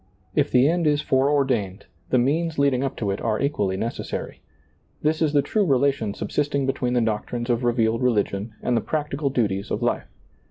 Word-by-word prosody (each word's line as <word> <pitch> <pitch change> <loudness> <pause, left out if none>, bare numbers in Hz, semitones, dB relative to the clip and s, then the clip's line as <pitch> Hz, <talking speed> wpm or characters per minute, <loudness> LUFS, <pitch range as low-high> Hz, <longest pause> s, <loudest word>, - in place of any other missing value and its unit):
If 145 -1 +2
the 125 +2 +4
end 170 0 +1
is 150 0 +2
foreordained, 130 -8 +1 0.2
the 130 - +3
means 155 +6 +1
leading 140 -2 +2
up 135 - -2
to 100 -3 -1
it 100 - -4
are 110 -2 0
equally 105 -10 0
necessary. 115 +4 -4 0.6
This 155 +2 +1
is 155 -2 +3
the 145 -1 +3
true 210 +9 +1
relation 135 - +1
subsisting 140 -2 -1
between 125 -2 -1
the 120 - +2
doctrines 115 +2 -2
of 120 +1 0
revealed 115 -1 +1
religion 110 -3 0
and 125 - +1
the 115 - +2
practical 150 0 -2
duties 105 -6 -1
of - - -2
life. - - 0
130 Hz, 185 wpm, -24 LUFS, 115-145 Hz, 0.6 s, the